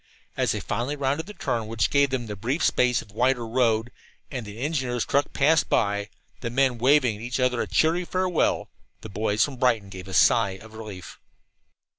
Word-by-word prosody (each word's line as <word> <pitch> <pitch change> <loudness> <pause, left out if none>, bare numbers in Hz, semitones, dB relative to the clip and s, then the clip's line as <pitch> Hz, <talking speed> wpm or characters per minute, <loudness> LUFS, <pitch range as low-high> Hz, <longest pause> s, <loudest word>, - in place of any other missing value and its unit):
As - - +1
they - - -2
finally 125 +6 -2
rounded 145 +4 -1
the 210 - -9
turn 115 -5 -2
which 110 0 0
gave 140 0 +4
them 130 -2 -2
the 105 -2 -6
brief 130 - -2
space 125 -2 +2
of 100 - -19
wider 120 +2 +1
road, 115 -1 +1 0.4
and 125 -6 -5
the 105 +1 -9
engineers' 130 -5 -1
truck 140 +1 +1
passed 150 +2 +3
by, 100 0 +1 0.3
the 120 - -4
men 130 -1 +1
waving 125 -4 +3
each 125 +3 -3
other 125 -1 +1
a - - -2
cheery 160 - +2
farewell, 185 -1 0 0.3
the 110 - -9
boys 105 +1 +1
from 140 -3 -8
Brighton 115 -6 +1
gave 95 -1 -9
a 95 - -8
sigh 95 -1 +4
of 110 +2 -14
relief. 105 -5 -9
120 Hz, 190 wpm, -25 LUFS, 110-135 Hz, 0.4 s, gave